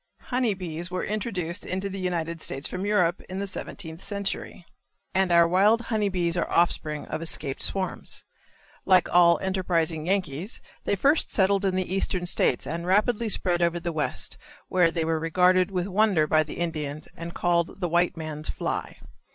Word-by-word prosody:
Honey 245 -5 +2
bees 175 -1 -5
were 185 0 -3
introduced 195 -4 -3
into 190 +2 -3
the 195 0 -6
United 170 -3 -2
States 135 +2 -1
from 185 +2 -4
Europe, 180 -4 +2
in 185 - -5
the 200 - -2
seventeenth 165 -3 -6
century, 200 -3 -3 0.5
and 190 -1 +2
our 170 0 +6
wild 200 +6 +4
honey 210 -2 +2
bees 175 -3 0
are 170 - -1
offspring 155 -3 +1
of 155 - -4
escaped 150 -4 -1
swarms. 190 -1 -2 0.6
Like 185 -2 +4
all 170 -1 +6
enterprising 170 -4 0
Yankees 185 - -1 0.3
they - - +1
first 280 - +2
settled 195 0 +2
in 190 -1 +1
the 185 -1 -1
eastern 185 -2 -1
states 135 -7 +2
and 170 +3 -4
rapidly 215 +4 +2
spread 175 -4 +2
over 170 0 +1
the 170 0 -3
West, 155 -1 -2 0.3
where 180 -2 +4
they 165 -1 -2
were 160 0 0
regarded 180 +3 +3
with 180 -2 -1
wonder 200 -5 +3
by 155 +1 +3
the 155 - -5
Indians 155 -3 -3
and 170 +1 -7
called 170 +1 0
the 180 - 0
"white 175 +1 +1
man's 155 -1 -5
fly." - - -3
180 Hz, 175 wpm, -26 LUFS, 165-195 Hz, 0.6 s, our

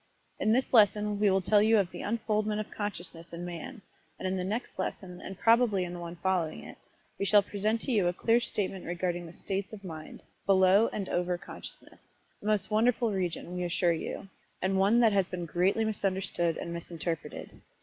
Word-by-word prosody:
In 215 - +2
this 255 +4 +1
lesson 210 -2 +4
we 210 -1 +4
will 190 0 +2
tell 205 +2 +4
you 220 +1 +5
of 195 -4 +1
the - - -7
unfoldment 215 -1 0
of 215 - -5
consciousness 175 -5 -5
in 170 +1 -6
Man, 175 +6 -7 0.3
and - - -3
in 185 - 0
the 185 - -2
next 210 +2 -4
lesson, 180 -1 -4
and 195 - -7
probably 230 -4 +4
in 175 0 -5
the 175 - -6
one 170 0 -6
following 175 -3 -1
it, - - -11 0.4
we 200 - 0
shall 205 0 +6
present 210 +3 -1
to 270 - -2
you 205 -7 +3
a - - +3
clear 230 +6 +3
statement 195 -5 -2
regarding 175 0 -2
the - - -10
states 195 +4 -4
of 205 -2 -9
mind, 160 -4 -8 0.2
below 195 +3 +5
and 195 -3 -3
over 180 0 0
consciousness - - -11 0.3
a - - -12
most 215 0 +1
wonderful 230 +1 +3
region, 180 -2 -3
we 180 - -2
assure 175 0 +2
you, 165 +4 -5 0.3
and 190 +1 +1
one 205 +5 +4
that 225 -3 +5
has 195 -2 +2
been 175 -2 -4
greatly 185 +7 +1
misunderstood 190 -5 -1
and 170 - -5
misinterpreted. 170 -1 -5
195 Hz, 200 wpm, -30 LUFS, 175-215 Hz, 0.4 s, shall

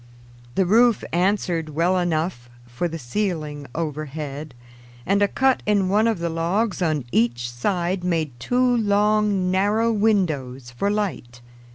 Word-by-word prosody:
The 190 - +2
roof 230 +4 +4
answered 175 -3 0
well 170 +5 +1
enough 160 -7 -2 0.2
for 120 +8 -3
the 165 0 -5
ceiling 150 - -3
overhead, 150 -2 -5 0.5
and 200 +2 +2
a 205 - +5
cut 265 +4 +2
in 200 -3 +2
one 215 +3 +3
of 225 -3 +1
the 170 0 -2
logs 180 +6 -1
on 155 -6 0
each 120 +1 +1
side 175 +8 -1
made 165 -5 0
two 250 - +2
long, 205 -3 +2
narrow 210 +5 +2
windows 155 - 0
for 160 +12 -1
light. 185 -13 -3
175 Hz, 140 wpm, -23 LUFS, 150-205 Hz, 0.5 s, a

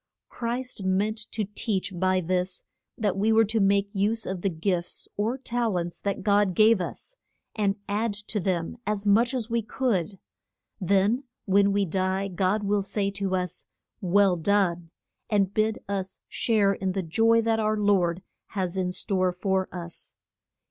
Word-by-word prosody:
Christ 240 -2 -4
meant 200 +4 +1
to 215 - -1
teach 205 -1 -2
by 185 +1 +2
this 180 +1 -2 0.3
that 205 -4 0
we 210 +3 +2
were 225 0 +5
to 220 +2 0
make 200 0 +3
use 215 +3 0
of 190 -2 -4
the 195 - +1
gifts 175 +1 -2
or 220 +5 -1
tal 235 -6 -1
ents 170 0 -4
that 200 -2 -3
God 205 -2 +3
gave 215 -1 +5
us, - - -6 0.4
and 200 -2 +1
add 210 +1 -1
to 210 +1 -4
them 175 +2 -1
as 210 -1 -1
much 230 +5 +4
as 235 -2 -3
we 235 0 +2
could. 210 - -1 0.6
Then 200 +7 +2 0.2
when 200 0 +4
we 200 0 +2
die 190 +2 -1
God 190 +3 0
will 200 0 +1
say 200 0 -1
to 195 -1 -1
us, 180 -1 -3 0.3
Well 195 0 +4
done, 175 -2 +1 0.4
and 200 -3 +2
bid 215 +1 +1
us 195 -1 -3
share 210 -4 +2
in 190 -1 -2
the 190 -1 -1
joy 225 +7 +3
that 225 0 +1
our 215 0 +1
lord 190 -4 +2 0.3
has 185 -1 -1
in 180 -1 0
store 185 -1 0
for 190 +1 -1
us. 170 -2 -8
200 Hz, 165 wpm, -26 LUFS, 185-215 Hz, 0.6 s, were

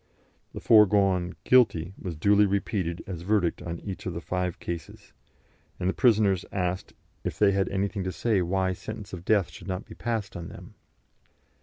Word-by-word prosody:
The - - -6
foregone 100 -4 +4
"Guilty" 95 -9 +3
was 90 -3 -6
duly 100 +5 +4
repeated 95 -3 -2
as 90 -4 -6
verdict 95 -2 +1
on 85 0 -5
each 95 -2 -6
of 90 - -4
the - - -2
five 90 0 -2
cases, 85 -1 -7 0.7
and 90 - -1
the 95 - +1
prisoners 105 -6 +3
asked 95 0 -2 0.3
if - - -3
they 105 -2 +5
had 95 -1 +1
anything 100 0 -1
to 95 - -1
say 105 +2 +1
why 95 +1 0
sentence 105 +2 -8
of 90 -1 -7
death 100 -4 +2
should 90 - -11
not 95 +2 -3
be - - -11
passed 115 -4 -3
on 85 -1 -6
them. - - -11
95 Hz, 175 wpm, -27 LUFS, 90-105 Hz, 0.7 s, they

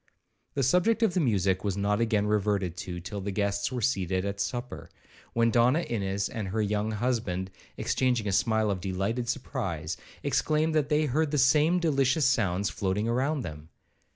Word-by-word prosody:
The 140 - +1
subject 195 - +3
of 215 -5 +3
the 185 - +1
music 95 - +1
was 100 -2 -1
not 105 +2 +1
again 110 -3 +1
reverted 100 -4 0
to 90 -1 -5
till 100 +4 -6
the 100 - -4
guests 100 +2 -1
were 125 -3 -3
seated 95 -5 0
at 100 0 -3
supper, 120 +5 -4 0.4
when 115 0 +3
Donna 125 +7 +4
Ines 100 - -2
and 110 -3 -5
her 105 +4 -2
young 105 +1 -1
husband, 105 -5 -2 0.3
exchanging 125 -4 0
a - - 0
smile 110 +1 +2
of 95 -2 -3
delighted 100 +6 -2
surprise, 95 - -3 0.3
exclaimed 155 +2 +1
they 150 0 +2
heard 150 +3 +1
the 150 - -1
same 150 +6 +4
delicious 140 -3 +2
sounds 100 -6 +1
floating 95 +4 -1
round 135 +5 0
them. 75 -1 -8
110 Hz, 170 wpm, -28 LUFS, 95-130 Hz, 0.4 s, Donna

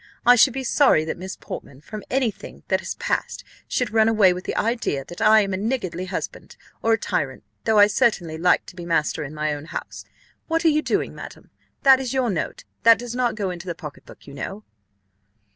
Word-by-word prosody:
I 245 - +8
should 245 +2 +5
be 265 +1 -4
sorry 255 - +4
that 160 - -3
Miss 190 +1 -6
Portman, 135 - -9
from 210 +7 -8
any 255 -4 +1
thing - - -13
that - - +2
has - - -5
passed, - - -2 0.2
should 250 - -1
run 220 0 +4
away 210 -5 +5
with 180 +1 -7
the - - -3
idea 220 - -1
that 175 - -10
I 215 0 +6
am 195 -1 -2
a - - -1
niggardly 195 -5 -2
husband, 185 - -6 0.2
or 225 - +3
a - - +3
tyrant, 135 -9 -2 0.2
though 220 -1 +3
I 205 - +9
certainly 205 -7 +1
like 180 +1 +3
to - - -12
be 175 - -8
master 165 -3 0
in 145 +1 -8
my 150 0 -1
own 145 0 -7
house. - - -7 0.4
What 330 +1 0
are - - +7
you 305 0 +2
doing, - - -1
madam? - - -11 0.3
that 265 -1 +7
is 265 0 -3
your 250 -4 +1
note, 170 - -3 0.2
that 230 0 +7
does 240 -1 -6
not 245 -2 0
go 200 -4 -2
into 175 +1 -8
the 170 - -3
pocket 150 -4 -10
book, - - -15
you 140 - -11
know." 195 +9 -6
210 Hz, 225 wpm, -23 LUFS, 170-240 Hz, 0.4 s, I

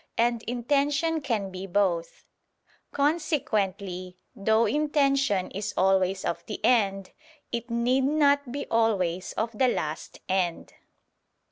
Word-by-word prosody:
And 235 0 +2
intention 285 +6 0
can 220 -8 -2
be 185 +1 -6
both. 175 -3 -1 0.7
Consequently 215 - -1 0.2
though 220 +3 +2
intention 275 - +1
is 200 +2 -4
always 190 0 +2
of - - -2
the 210 - -5
end, 195 -5 +2 0.4
it 235 +1 -4
need 245 +3 +1
not 285 -2 +2
be 285 +2 -4
always 190 -6 +1
of 225 +1 -3
the 255 +4 +3
last 155 -9 -3
end. 185 -3 -1
225 Hz, 115 wpm, -27 LUFS, 190-275 Hz, 0.7 s, the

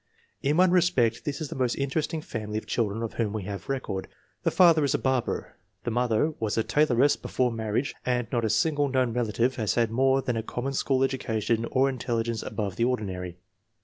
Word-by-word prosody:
In 145 +3 +1
one 185 0 +5
respect 165 -11 +2
this 145 +1 -3
is 155 - -3
the - - -6
most 125 -2 0
interesting 155 +3 -1
family 105 -1 -4
of 110 - -4
children 115 -1 -1
of 115 - -4
whom 110 -3 -1
we 110 -3 -3
have 100 +4 -6
record. 125 -8 -3 0.3
The - - +2
father 165 -4 +5
is 140 - +2
a - - +3
barber, 130 -2 -1 0.3
the 120 - -2
mother 120 +5 +1
was 110 -1 -1
a 115 - +3
tailoress 135 +3 +3
before 125 -1 -1
marriage, 115 +3 -2
and 125 -1 0
not 120 -2 0
a 110 - +1
single 145 +4 +2
known 130 -3 +1
relative 120 +1 0
has 110 -4 0
had 115 -2 +2
more 135 +2 +3
than 125 -3 -1
a - - 0
common 125 +4 -4
school 135 0 +1
education 115 -4 0
or 130 +3 +2
intelligence 115 -3 -2
above 100 -5 -4
the 115 - +1
ordinary. 95 -8 -2
120 Hz, 205 wpm, -27 LUFS, 110-135 Hz, 0.3 s, one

